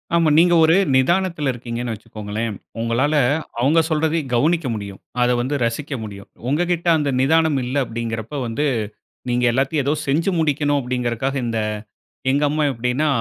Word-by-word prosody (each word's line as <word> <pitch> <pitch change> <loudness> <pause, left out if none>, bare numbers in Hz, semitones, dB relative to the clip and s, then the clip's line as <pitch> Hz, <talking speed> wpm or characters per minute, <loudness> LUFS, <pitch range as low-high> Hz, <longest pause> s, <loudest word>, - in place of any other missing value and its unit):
ஆமா. 165 -2 +4
நீங்க 175 +1 +5
ஒரு 160 +1 +5 0.2
நிதானத்துல 170 0 +2
இருக்கீங்கன்னு 120 -1 -4
வச்சுக்கோங்களேன். 105 +1 -5 0.2
உங்களால 120 +6 +1 0.4
அவுங்க 145 +7 +4
சொல்றதையும் 155 -2 0
கவுனிக்க 155 +4 +2
முடியும். 100 -2 -6 0.2
அத 125 - +3
வந்து 135 +4 -1
ரசிக்க 135 +5 -3
முடியும். 100 -2 -9 0.2
உங்ககிட்ட 175 +3 0
அந்த 145 -2 0
நிதானம் 160 +1 +3
இல்ல 125 +2 -4
அப்படிங்கறப்ப 115 +3 -4
வந்து 115 +7 -1 0.6
நீங்க 120 0 +1
எல்லாத்தையும் 135 +4 0
ஏதோ 145 - +2
செஞ்சு 165 +7 +1
முடிக்கணும் 145 -2 +1
அப்படிங்கிறகாக 125 +1 -2
இந்த 115 -1 -1 0.7
எங்க 145 +2 +1
அம்மா 155 +1 0
எப்டினா, 125 +5 -1
135 Hz, 140 wpm, -21 LUFS, 115-155 Hz, 0.7 s, நீங்க